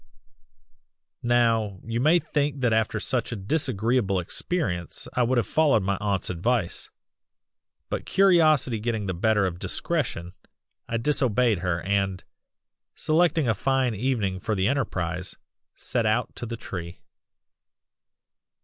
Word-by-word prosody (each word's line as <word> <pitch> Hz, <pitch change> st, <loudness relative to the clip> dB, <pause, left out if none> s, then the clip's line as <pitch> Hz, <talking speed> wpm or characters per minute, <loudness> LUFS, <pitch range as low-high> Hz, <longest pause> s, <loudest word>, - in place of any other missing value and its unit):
"Now 115 Hz, -5 st, +2 dB
you 115 Hz, 0 st, -3 dB
might 160 Hz, +7 st, +3 dB
think 145 Hz, -2 st, -1 dB
that 120 Hz, -3 st, +2 dB
after 110 Hz, 0 st, +1 dB
such 120 Hz, +2 st, -1 dB
a -, -, -2 dB
disagreeable 115 Hz, -3 st, +1 dB
experience 90 Hz, -, -2 dB
I 125 Hz, -, +1 dB
would 125 Hz, +1 st, +2 dB
have 120 Hz, -, +2 dB
followed 145 Hz, -10 st, +3 dB
my 100 Hz, +1 st, 0 dB
aunt's 100 Hz, -3 st, 0 dB
advice, 95 Hz, +2 st, -1 dB, 1.0 s
but -, -, -4 dB
curiosity 155 Hz, -, +4 dB
getting 110 Hz, -1 st, -2 dB
the 95 Hz, -, -2 dB
better 105 Hz, +3 st, +2 dB
of 90 Hz, -2 st, -3 dB
discretion 110 Hz, -, -2 dB, 0.6 s
I 115 Hz, -, 0 dB
disobeyed 120 Hz, -, +2 dB
her 85 Hz, -2 st, -2 dB
and, 100 Hz, -1 st, -1 dB, 0.7 s
selecting 160 Hz, -2 st, +2 dB
a 115 Hz, -, +3 dB
fine 130 Hz, +2 st, +1 dB
evening 105 Hz, -4 st, -1 dB
for 110 Hz, +2 st, -2 dB
the 95 Hz, 0 st, +1 dB
enterprise, 90 Hz, -9 st, -2 dB, 0.4 s
set 115 Hz, -3 st, -1 dB
out 110 Hz, +3 st, 0 dB
to 120 Hz, -, -4 dB
the 115 Hz, +1 st, -5 dB
tree. 85 Hz, -5 st, -7 dB
115 Hz, 130 wpm, -25 LUFS, 95-130 Hz, 1.0 s, curiosity